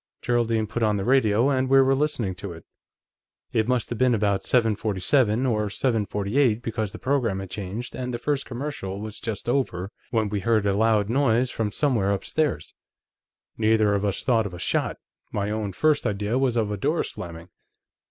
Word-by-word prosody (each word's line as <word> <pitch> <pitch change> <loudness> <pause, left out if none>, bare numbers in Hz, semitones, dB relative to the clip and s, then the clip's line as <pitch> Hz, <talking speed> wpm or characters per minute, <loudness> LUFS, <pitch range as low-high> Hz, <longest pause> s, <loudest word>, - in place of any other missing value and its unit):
Geraldine 115 -2 +1
put 110 +3 -4
on 105 -2 +2
the 100 - -2
radio, 120 -1 +3
and 130 -1 +1
we 135 0 +6
were 135 0 +4
listening 135 -8 0
to 95 0 -7
it. 80 - -13 0.9
"It 110 0 +2
must 125 -3 0
have 120 - -4
been 130 -2 +4
about 100 -2 +1
7:47 110 - +1
or 105 -3 +1
7:48, 110 +1 0
because 110 -3 -2
the - - -8
program 125 -7 0
had 95 -1 -6
changed 105 +5 -5
and 125 -1 -4
the 120 - -2
first 140 +3 -1
commercial 120 -7 -5
was 110 0 -6
just 110 -1 -5
over, 110 -8 -1 0.2
when 110 -2 +1
we 100 0 -1
heard 110 0 +1
a 100 - +2
loud 105 -1 +2
noise 125 0 +2
from 110 -2 -2
somewhere 115 -7 +1
upstairs. 145 +9 -2 0.9
Neither 110 -1 +3
of 100 0 0
us 100 -2 -1
thought 115 -4 +2
of 90 - -9
a - - -9
shot; - - -1 0.3
my 100 0 -2
own 105 -2 -2
first 155 +9 +2
idea 105 +3 -1
was 130 -3 +1
of 110 -2 0
a 105 - -2
door - - 0
slamming. 85 +1 -8
110 Hz, 185 wpm, -25 LUFS, 100-125 Hz, 0.9 s, we